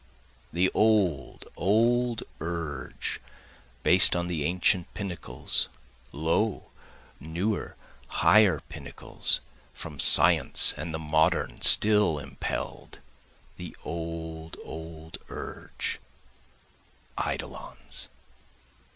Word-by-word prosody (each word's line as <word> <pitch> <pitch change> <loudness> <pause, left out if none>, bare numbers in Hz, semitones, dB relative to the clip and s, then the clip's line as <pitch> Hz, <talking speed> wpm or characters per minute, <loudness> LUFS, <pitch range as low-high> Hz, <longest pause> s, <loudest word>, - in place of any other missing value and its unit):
The 90 +3 +1
old, 100 - 0
old 115 +4 +1 0.2
urge, 80 -5 -5 0.6
Based 90 0 +6
on 85 0 -1
the 85 -4 -3
ancient 90 +2 0
pinnacles, 90 - -4 0.4
lo, 80 +8 -2 0.5
newer, 85 +8 -4 0.3
higher 105 -2 +3
pinnacles, 80 -5 -1 0.3
From 75 -3 -9
science - - +6
and 85 - -6
the 80 - -4
modern 80 +2 0
still 105 -7 +7
impell'd, 70 -2 -6 0.6
The - - -10
old, 80 -1 -7
old 80 0 -9
urge, - - -6 1.2
eidolons. 60 0 -5
85 Hz, 80 wpm, -26 LUFS, 80-95 Hz, 1.2 s, still